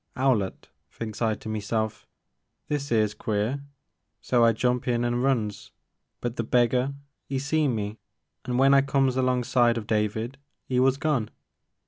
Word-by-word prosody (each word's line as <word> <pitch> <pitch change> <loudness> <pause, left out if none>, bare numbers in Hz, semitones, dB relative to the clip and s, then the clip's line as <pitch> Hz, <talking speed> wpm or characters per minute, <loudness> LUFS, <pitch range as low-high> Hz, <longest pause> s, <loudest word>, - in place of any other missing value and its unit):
'Owlett, 125 -8 0 0.2
thinks 110 -1 -7
I 110 -2 +2
to 110 - -11
meself, 110 0 -2 0.6
this 145 -2 -2
*ere 110 -2 +4
*s 105 -1 -2
queer, 110 +6 -2 0.6
so 120 -2 +2
I 115 - +6
jumps 125 +3 0
in 120 -1 +1
an* 120 0 0
runs, 115 -6 -1 0.5
but 120 0 -3
the 115 - 0
beggar 125 +3 +2 0.3
*e 135 - -1
seen 145 -1 +1
me 105 0 -4 0.5
an* 125 - -3
w*en 135 +2 +5
I 140 - +7
comes 135 -1 +1
alongside 125 -2 +2
of 110 - -4
David, 110 +4 -1 0.3
*e 125 - +3
was 130 +1 +3
gone. 140 -8 0
120 Hz, 155 wpm, -26 LUFS, 110-135 Hz, 0.6 s, I